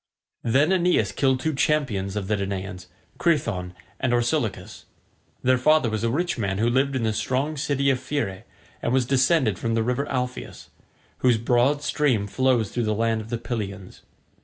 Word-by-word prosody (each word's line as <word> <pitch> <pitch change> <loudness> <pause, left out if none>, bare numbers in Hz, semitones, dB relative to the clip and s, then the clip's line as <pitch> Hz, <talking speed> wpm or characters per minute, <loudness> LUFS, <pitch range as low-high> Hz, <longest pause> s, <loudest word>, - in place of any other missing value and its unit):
Then 140 +8 +3
Aeneas 180 -1 +2
killed 130 -2 +1
two 160 +2 0
champions 130 -10 0
of 100 -2 -3
the 105 - +1
Danaans, 95 -2 -4 0.3
Crethon 115 - 0 0.2
and 130 -2 0
Orsilochus. 120 0 -1 0.6
Their 130 0 +3
father 155 -3 +3
was 110 0 -2
a 115 - +2
rich 165 +2 -1
man 100 -3 -1
who 115 +3 +2
lived 135 +2 +1
in 125 - -1
the 110 -1 +1
strong 135 +7 -1
city 140 -1 +1
of 130 - 0
Phere 130 -8 -3 0.4
and 120 - -1
was 130 -2 +3
descended 130 - +2
from 115 0 -1
the 115 - +1
river 125 +4 -1
Alpheus, 125 -1 -4 0.5
whose 125 -3 +3
broad 125 +5 +2
stream 130 -11 +1
flows 120 0 +1
through 120 -2 -1
the 110 0 0
land 115 0 0
of 110 - -11
the 120 - -1
Pylians. 100 -5 -6
120 Hz, 175 wpm, -24 LUFS, 110-140 Hz, 0.6 s, Then